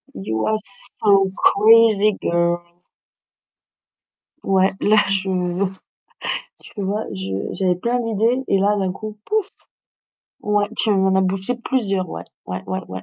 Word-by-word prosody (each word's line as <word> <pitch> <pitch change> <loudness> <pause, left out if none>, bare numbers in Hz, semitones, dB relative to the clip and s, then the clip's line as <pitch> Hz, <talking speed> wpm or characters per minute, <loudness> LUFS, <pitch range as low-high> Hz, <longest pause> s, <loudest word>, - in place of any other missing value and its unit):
You 110 +3 -2
are 215 - +1
so 195 0 +1
crazy, 215 -1 +5
girl! 170 0 +1 1.8
Ouais, 190 0 +2
là, 215 +1 +4
je 195 -1 0 1.3
tu 205 - -9
vois? 205 +3 -1
Je 95 +1 -4
j'avais 185 -2 +1
plein 235 +7 -1
d'idées, 230 +3 0
et 195 - +3
là, 200 +2 +2
d'un 190 -2 0
coup, 215 +2 -8
pouf! 425 -2 0 0.9
Ouais, 205 0 +1
tu 220 - +2
m'en 190 -1 +2
as - - +4
bouché 190 +5 -1
plusieurs, 205 -7 -1
ouais, - - -6 0.2
ouais 90 0 -5
ouais 185 - -3
ouais. 95 0 -7
195 Hz, 135 wpm, -21 LUFS, 185-215 Hz, 1.8 s, crazy